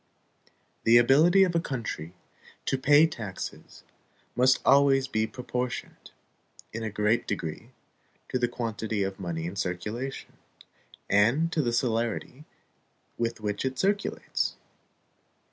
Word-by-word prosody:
The 115 +1 +6
ability 155 +10 +6
of 180 -2 +1
a 165 - +2
country 110 - -5 0.5
to - - +1
pay 145 +3 +6
taxes 110 - -7 0.5
must 130 +1 +4
always 135 -1 +5
be 110 -4 0
proportioned, 125 0 -5 0.6
in 115 - -4
a 110 - -2
great 105 +2 +1
degree, 80 -6 -4 0.6
to 130 - -1
the 120 - +2
quantity 110 -3 -3
of 95 0 -4
money 85 -3 -4
in 90 +3 -5
circulation, 105 +9 -4 0.7
and 120 +12 +3
to 165 - +1
the 120 -4 0
celerity 120 +3 -1 0.7
with 115 -1 -2
which 105 -1 -2
it 130 -1 -2
circulates. 200 +4 -1
120 Hz, 120 wpm, -27 LUFS, 105-135 Hz, 0.7 s, The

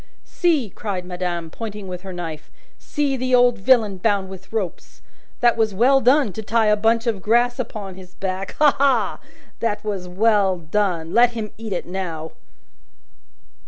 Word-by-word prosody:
"See!" 310 - 0
cried 190 -3 -4
madame, 175 -2 -4
pointing 210 -2 -7
with 180 -1 -6
her 190 0 -8
knife. 165 -4 -6 0.3
"See 285 -2 -1
the 255 0 +1
old 245 -2 +4
villain 215 -2 +3
bound 195 -1 0
with 190 0 -11
ropes. 205 -6 -5 0.4
That 240 -1 +4
was 220 -3 +1
well 265 +6 +4
done 255 -3 +3
to 220 - -5
tie 225 +1 +1
a 210 0 +4
bunch 225 +2 +1
of 220 -5 -1
grass 240 +4 +2
upon 210 -5 -5
his 180 -1 -14
back. 190 0 -4
Ha, 300 -2 +4
ha! 275 -2 +2 0.4
That 220 -3 -1
was 200 -4 -4
well 195 0 +2
done. 170 -1 -1
Let 240 0 +5
him 220 -2 -5
eat 220 -1 -8
it 180 - -2
now!" 170 -4 -5
210 Hz, 165 wpm, -22 LUFS, 185-235 Hz, 0.4 s, Let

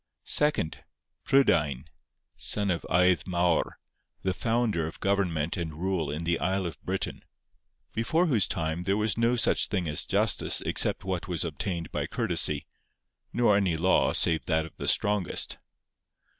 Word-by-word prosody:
Second, 150 - +1 0.4
Prydain, 75 - +2 0.5
son 100 -2 -1
of 85 - -2
Aedd 90 +1 +3
Mawr, 85 -2 0 0.5
the 95 - 0
founder 115 -7 0
of 80 - -9
government 90 -5 0
and 80 -3 -4
rule 90 -4 -1
in 75 +3 -4
the 85 0 0
isle 95 +1 0
of 85 -5 -6
Britain, - - -4 0.7
before 120 +11 +1
whose 120 - +2
time 80 +1 -2
there 100 +2 +1
was 105 -1 0
no 115 +1 +2
such 120 - +2
thing 95 -5 -2
as 75 0 +1
justice - - +2
except - - +3
what 95 -1 -3
was 90 -2 -1
obtained 85 +2 -4
by - - -2
courtesy, - - -1 0.7
nor 120 -4 +3
any 95 -5 +1
law 90 +4 +3
save 80 -2 +2
that 80 -1 +1
of 80 - -13
the - - -5
strongest. 100 -4 0
90 Hz, 150 wpm, -27 LUFS, 80-105 Hz, 0.7 s, Aedd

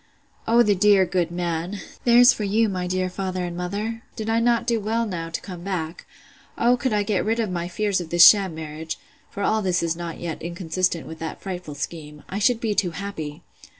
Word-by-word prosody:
O 235 +1 +5
the 210 -2 +3
dear 200 0 +5
good 180 -2 0
man! 175 +2 -3 0.3
There's 245 +1 +7
for 215 - -4
you, 215 +2 +2
my 180 -2 -3
dear 185 0 0
father 185 0 -3
and 175 -1 -5
mother!—Did 215 +4 -4
I 225 - +3
not 235 0 +2
do 235 -2 +1
well 225 +3 0
now 170 -5 -4
to 165 - -4
come 180 -3 -8
back?—O 185 +6 -3
could 250 +1 -1
I 210 -1 +2
get 205 -2 0
rid 225 +2 0
of 220 -4 -1
my 175 -1 -2
fears 195 +1 0
of 165 - -8
this 175 +1 +9
sham 195 -5 +5
marriage, 160 0 -6 0.3
(for 200 - -5
all 220 +2 +2
this 180 -3 0
is 165 0 0
not 170 -1 -6
yet 170 -2 -5
inconsistent 170 0 -2
with 160 0 -9
that 160 -1 -5
frightful 180 -6 -6
scheme,) 150 0 -6
I 195 - -3
should 230 +2 +3
be 225 -2 -1
too 195 -3 +1
happy! 160 -7 -6
185 Hz, 210 wpm, -23 LUFS, 170-215 Hz, 0.3 s, this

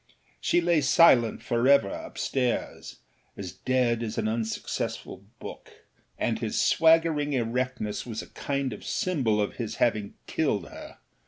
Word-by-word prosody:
She 175 - +2
lay 170 -2 +3
silent 130 -5 +5
for 120 +1 +1
ever 140 0 +5
upstairsâas 290 - -3 0.7
dead 125 -3 +2
as 110 -2 -4
an - - 0
unsuccessful 110 0 -3
book, - - -11 0.3
and 110 -1 -1
his 110 -2 -2
swaggering 160 -2 +3
erectness 125 -3 -2
was 115 -3 -5
a - - -13
kind 140 -3 -2
of 105 - -10
symbol 130 -13 0
of 105 - -2
his 115 -3 -4
having 105 -4 0
killed - - -1
her. - - -11
125 Hz, 135 wpm, -27 LUFS, 115-145 Hz, 0.7 s, silent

